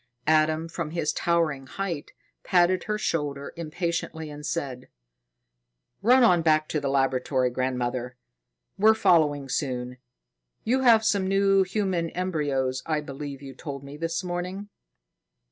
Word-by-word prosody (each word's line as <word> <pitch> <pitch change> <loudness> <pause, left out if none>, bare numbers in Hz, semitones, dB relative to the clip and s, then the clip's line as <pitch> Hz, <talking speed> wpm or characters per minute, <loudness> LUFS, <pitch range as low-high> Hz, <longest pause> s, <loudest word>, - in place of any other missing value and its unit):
Adam, 155 +1 +2
from 165 -1 -4
his 160 -2 -1
towering 160 -6 0
height, 170 0 -4 0.3
patted 180 0 +3
her 210 0 -1
shoulder 145 -7 -2
impatiently 165 -1 -3
and 150 0 -7
said: 130 -6 -4 1.1
"Run 250 +5 +5
on 180 -7 +5
back 155 -1 +3
to 155 - 0
the 140 -1 -2
laboratory, 130 -1 +1
grandmother. 125 0 -2 0.6
We're 220 +2 +6
following 150 -8 +3
soon. 125 -2 -3 0.7
You 255 +4 +1
have 230 -4 +5
some 200 -3 +2
new 195 0 +4
human 185 -3 -1
embryos, 145 -8 -1
I 155 -2 0
believe 140 -1 -7
you 135 -1 -8
told 140 -3 -7
me 140 +1 -9
this 165 +3 -2
morning." 180 +3 -4
155 Hz, 130 wpm, -26 LUFS, 140-180 Hz, 1.1 s, We're